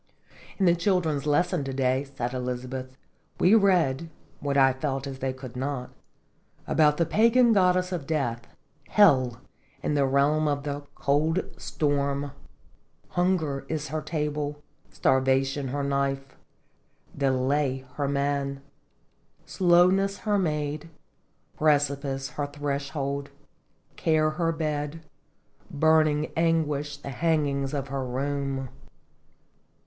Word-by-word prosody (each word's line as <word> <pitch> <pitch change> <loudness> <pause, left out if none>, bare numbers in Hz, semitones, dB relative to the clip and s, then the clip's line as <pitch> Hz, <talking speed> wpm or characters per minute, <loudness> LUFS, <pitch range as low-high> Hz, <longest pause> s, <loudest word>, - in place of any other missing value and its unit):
"In 195 - +2
the 170 - +6
children's 170 -5 0
lessons, 165 +2 +2
to 135 - -4
day," 130 +1 +1
said 135 -3 -4
Elizabeth, 130 +1 -5 0.2
" - - -38
we 185 - +5
read 170 -8 +3 0.3
(what 140 -1 -1
I 135 -1 +5
felt 135 0 -3
as 135 -1 -6
they 135 0 -1
could 130 -1 -9
not) 130 -1 -3 0.7
about 150 -2 +3
the 170 - +2
pagan 230 +6 +4
goddess 185 -2 +3
of 165 -7 -4
death, 120 -7 -2 0.2
' - - -32
Hel 130 - +5 0.2
' 140 0 -34
in - - 0
the 140 -2 +2
realm 145 +3 +2
of 145 -1 -1
the 145 0 -3
Cold 155 +5 +1
Storm. 140 -1 -1 0.8
Hunger 175 -6 0
is 155 -1 -3
her 155 0 -2
table, 150 -1 -3 0.3
Starvation 135 +1 +1
her 140 +2 -2
knife, 135 -1 -1 0.8
Delay 135 0 0
her 145 -1 -2
man, 140 0 -1 0.8
Slowness 185 +2 +3
her 205 -1 +2
maid, 150 -2 -2 0.7
Precipice 140 -2 +1
her 145 -1 -3
thresh 145 0 -4
old, 140 0 -2 0.7
Care 155 -1 +2
her 165 +1 0
bed, 155 -1 -3 0.7
burning 155 0 +2
Anguish 150 -3 0
the 145 - -8
hang 160 +2 +1
ings 140 -1 -2
of 135 -1 -3
her 135 -1 -2
room." 135 +1 -2
145 Hz, 125 wpm, -26 LUFS, 135-160 Hz, 0.8 s, the